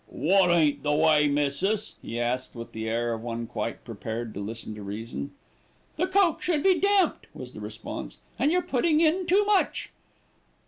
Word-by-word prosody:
"Wot 180 +6 +3
ain't 160 -4 +3
the 150 - 0
way, 150 -1 +4
missis?" 145 +9 0
he 115 - -5
asked 125 +2 -2
with 115 0 -8
the 110 0 -4
air 120 +1 0
of 110 - -5
one 115 0 -4
quite - - -4
prepared 115 0 -5
to - - -6
listen 110 +2 -6
to 105 - -9
reason. 100 -7 -5 0.7
"The 360 +4 0
coke 375 -3 +3
should 315 -4 0
be 375 -2 +4
damped," 400 -1 +2
was - - -8
the - - -9
response, - - -7 0.2
"and 295 - +3
you're 360 +1 +2
putting 305 +4 +2
in 335 +3 +2
too 400 +3 +4
much." 410 -2 +1
150 Hz, 180 wpm, -27 LUFS, -, 0.7 s, way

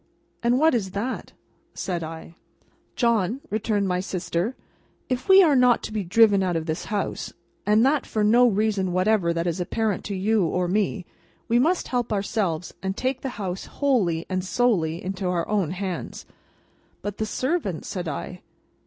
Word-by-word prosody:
"And 240 +1 +3
what 315 +2 +4
is 195 -6 -1
that?" 245 +5 -4 0.4
said 175 -3 -3
I. 160 +1 -8 0.6
"John," 235 -1 +1
returned 210 -2 0
my 180 -1 0
sister, 185 +4 -2 0.5
"if 255 +4 -2
we 385 0 +9
are 305 -5 +4
not 250 -2 +4
to - - -5
be 210 -2 -1
driven 200 +2 +4
out 180 -2 0
of 160 -1 -1
this 160 -1 -3
house, 205 -2 -3 0.3
and 215 +3 +5
that 280 0 +2
for 215 - 0
no 240 +4 +6
reason 205 -4 +1
whatever, 185 -1 +2
that 170 0 -1
is 170 0 -1
apparent 210 +2 -1
to 200 - -3
you 205 +2 +2
or 180 +2 0
me, 195 0 0 0.4
we 235 +1 +3
must 340 +8 +1
help 245 -2 -1
ourselves 195 -5 -1
and 190 0 -3
take 260 0 -1
the 270 - -3
house 190 -3 -4
wholly 200 - 0
and 185 -1 -2
solely 185 -7 0
into 190 0 -3
our 175 -2 0
own 200 -6 0
hands." 185 0 -5 0.8
"But, 205 -1 -4
the 220 - -1
servants," 255 - -2
said 180 -3 -4
I. 180 +4 -5
200 Hz, 170 wpm, -24 LUFS, 180-235 Hz, 0.8 s, we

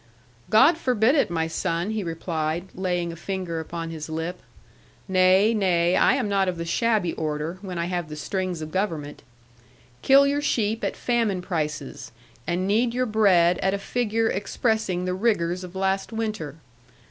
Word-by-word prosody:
'God 275 +10 +5
forbid 250 -3 +2
it, 285 - +2
my 165 -1 0
son!' 170 +3 -2
he 220 -2 -2
replied, 165 +1 -3
laying 180 -2 -2
a - - -8
finger 180 -1 -4
upon 165 +1 -5
his 160 -1 -7
lip: 165 +3 -4 0.7
'Nay, 190 +3 +4
nay, 180 -4 +2
I - - +4
am 255 -5 -1
not 195 -1 +1
of 180 - -4
the 170 - -4
shabby 210 -1 +1
order, 155 +3 -3
when 185 -3 -6
I 170 - -1
have 175 -3 -3
the 150 - -6
strings 180 +2 -3
of 155 - -7
government. 165 -7 -3 0.8
Kill 275 +1 +6
your 285 +1 +1
sheep 225 -5 0
at - - -2
famine 225 -7 0
prices, 150 -6 -4 0.4
and 180 +2 -1
knead 230 +4 +1
your 255 0 +1
bread 190 -6 +3
at 190 +1 +1
a - - -1
figure 225 +1 -1
expressing 200 -2 -1
the 180 - -1
rigours 185 -4 0
of 180 0 -10
last 195 +2 -1
winter. 215 -10 -3
185 Hz, 170 wpm, -24 LUFS, 170-215 Hz, 0.8 s, Kill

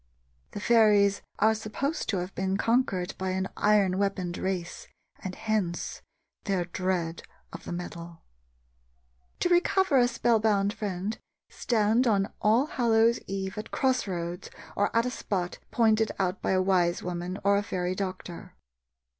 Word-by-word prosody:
The - - -4
fairies 210 -3 +4 0.2
are 220 0 +4
supposed 245 +8 -3
to 200 - +1
have 180 +2 -4
been 190 0 -1
conquered 225 -7 +1
by 190 0 -2
an 190 0 -1
iron 200 -3 +3
weaponed 190 -3 -1
race, 185 -3 -3 0.3
and 185 -1 -6
hence 205 -6 -2 0.4
their 190 -4 0
dread 175 -2 -2 0.3
of 165 - -9
the - - -6
metal. 170 -1 -7 1.2
To 355 - +2
recover 355 -3 +3
a 245 - +5
spell 235 -1 +2
bound 205 -2 +2
friend, 200 +1 -4 0.3
stand 230 +2 +2
on 200 -2 +1
All 225 +6 +4
Hallows' 230 -4 +2
eve 195 +1 -4
at 220 - -7
cross 260 -4 +1
roads 175 0 -4 0.3
or 205 - +2
at 230 - +3
a 250 - -1
spot 180 -7 -3
pointed 220 -2 +2
out 185 0 -1
by - - 0
a 185 - +3
wise 180 -2 +2
woman 180 +1 -4
or 200 +1 +3
fairy 180 -2 -2
doctor. 185 -2 -6
200 Hz, 145 wpm, -28 LUFS, 185-220 Hz, 1.2 s, a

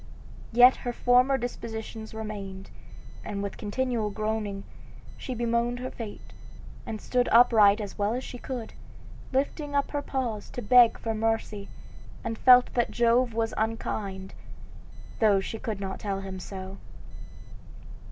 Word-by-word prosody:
Yet 245 +2 +7
her 245 - -4
former 250 +3 +4
disposition 225 -2 -6
remained, 200 -3 -7 0.5
and 200 -1 -4
with 200 - -4
continual 225 0 -2
groaning, 210 -1 -3 0.5
she 255 - -6
bemoaned 235 +1 0
her 255 +1 -5
fate, 220 -3 -9 0.5
and 220 - -4
stood 250 +2 0
upright 225 -3 +6
as 205 -2 -7
well 205 +3 +1
as 255 - -4
she 245 - -8
could, 245 -4 -6 0.6
lifting 285 +2 -1
up 280 - +1
her 290 - -1
paws 245 -7 -3
to 245 - -5
beg 240 +2 +6
for 225 - -3
mercy, 220 -2 -2 0.5
and 230 -1 -3
felt 250 +2 +6
that 240 - +1
Jove 235 0 +2
was 225 0 0
unkind, 205 -3 -3 0.9
though 210 -3 +4
she 215 +3 -5
could 215 -4 -4
not 190 -1 -5
tell 195 -2 -3
him 190 -1 -6
so. 190 +1 -8
225 Hz, 140 wpm, -27 LUFS, 205-245 Hz, 0.9 s, Yet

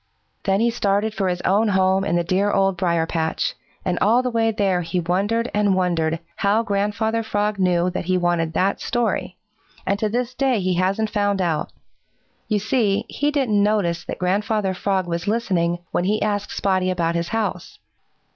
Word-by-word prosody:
Then 195 +1 +2
he 235 0 +3
started 210 -1 0
for 195 -3 -1
his 180 0 -2
own 205 +4 +2
home 190 -1 +2
in 185 -3 0
the 175 - +2
dear 190 +4 +1
Old 195 -2 +2
Briar 170 -2 +1
patch, 160 -1 -1 0.3
and 180 -1 0
all 235 +5 +4
the 250 - -1
way 225 -1 +2
there 195 -4 +1
he 180 +2 -2
wondered 200 +7 0
and 205 -2 +2
wondered 165 -3 0 0.2
how 205 +3 +2
Grandfather 210 +2 0
Frog 210 -2 -1
knew 180 -1 +2
that 180 - -4
he 185 +1 +1
wanted 175 -2 0
that 190 +4 0
story, 225 -6 -1 0.5
and 200 +1 0
to 215 - 0
this 245 +3 -2
day 260 -3 +1
he 185 -1 0
hasn't 195 +5 0
found 205 -2 0
out. 165 -5 -1 0.8
You 215 - +1
see, 215 0 +1
he 290 - 0
didn't 260 -9 +1
notice 200 -5 +1
that - - -5
Grandfather 195 +2 0
Frog 190 0 -1
was 170 +1 -3
listening 185 -6 0
when 175 - 0
he 210 +3 +1
asked 205 -1 -1
Spotty 185 -2 0
about 170 -2 0
his 170 0 -1
house. 225 +1 -3
195 Hz, 185 wpm, -22 LUFS, 180-215 Hz, 0.8 s, all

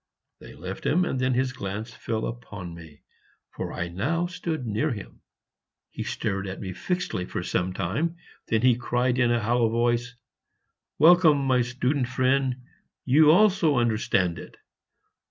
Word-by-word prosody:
They - - -12
left 95 +2 -7
him; 180 +4 +2
and 130 - -2
then 130 0 +1
his 130 0 0
glance 105 +2 -5
fell 110 0 -3
upon 105 -7 -7
me, 80 -3 -13 0.5
for - - -5
I 85 - -3
now 135 - -1
stood 175 -6 -4
near 110 +8 0
him. 105 -5 -8 0.7
He - - -6
stared 100 -2 -3
at 95 - -6
me 95 -3 -5
fixedly 180 - -2
for - - -4
some 90 +1 -1
time; 125 - -2 0.3
then 110 +1 +1
he 125 -2 +5
cried 125 +1 0
in 120 -1 +3
a 120 0 +2
hollow 115 +1 +2
voice, 120 +1 0 0.8
"Welcome, 160 -3 +6
my 130 -2 +3
student 125 +2 -1
friend! 130 0 0 0.4
you 150 +4 +5
also 180 -5 +4
understand 110 -7 +1
it!" - - -12
125 Hz, 155 wpm, -26 LUFS, 105-140 Hz, 0.8 s, Welcome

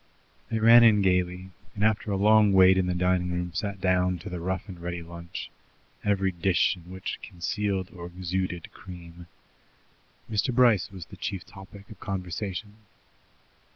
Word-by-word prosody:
They 115 - -1
ran 115 +2 +8
in 105 -3 +5
gaily, 90 0 0 0.2
and 105 - -2
after 110 0 +1
a 100 - 0
long 105 0 +5
wait 95 0 +7
in 95 -1 +1
the 90 - -1
drawing 90 0 +1
room 90 0 -3
sat 100 +1 -3
down 90 -1 +1
to 100 - -6
the 90 - -4
rough 95 +4 -3
and 90 -3 -9
ready 85 0 -4
lunch, 85 0 -8 0.5
every 100 -2 +1
dish 85 +1 +2
in 90 -1 -15
which 95 0 -5
concealed 95 +2 -3
or 85 -2 -8
exuded 90 -1 -4
cream. 85 -1 -12 1.0
Mr. 110 +4 0
Bryce 120 -7 +4
was 95 -4 -8
the - - -13
chief 95 -3 -4
topic 100 +1 -13
of 105 - -12
conversation. 95 +2 -5
95 Hz, 160 wpm, -27 LUFS, 90-100 Hz, 1.0 s, ran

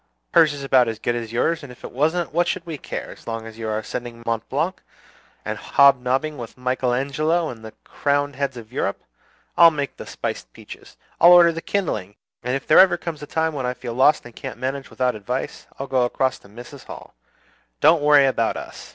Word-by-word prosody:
Hers 155 - +6
is 145 -1 -7
about 130 -3 +4
as 115 -1 -3
good 120 - -1
as 115 -2 -5
yours; 160 +8 0
and 140 -4 -10
if 125 - -16
it - - -7
wasn't, 160 +6 0
what 175 +1 +2
should 175 -1 -2
we 160 -4 -6
care, - - -6
as - - -15
long 115 -1 -4
as 115 0 -11
you 110 -1 -3
are 110 - -1
ascending 115 +1 -6
Mont 115 -1 -2
Blanc, - - -2 0.6
and - - -4
hob 140 -2 +4
nobbing 135 +4 -1
with 115 0 -9
Michael 125 0 -1
Angelo 155 +6 0
and 115 -2 -9
the 110 -1 -9
crowned 145 -1 -1
heads 135 -2 -3
of 115 -1 -11
Europe? 100 - -2 0.5
I'll 170 -1 +8
make 145 -3 -4
the - - -9
spiced - - -5
peaches! - - -13 0.2
I'll 175 +1 +8
order 175 -1 +7
the 165 0 -6
kindling! 110 - -2 0.3
And 125 +1 -2
if 135 - -4
there 155 - +6
ever 185 -2 +6
comes 165 -3 -6
a 145 - -8
time 160 +1 -1
when 135 -4 -3
I 125 - -2
feel 120 -2 -6
lost 130 +4 +3
and 120 - -12
can't - - -7
manage 135 +2 -4
without 125 -1 0
advice, 120 +5 -5
I'll 135 - -4
go 130 -1 +1
across 130 +2 0
to 100 - -19
Mrs. 120 +5 -12
Hall. - - -11 0.7
Don't 160 +1 +5
worry 145 -1 +6
about 115 -4 0
us. - - -9
135 Hz, 220 wpm, -22 LUFS, 120-155 Hz, 0.7 s, I'll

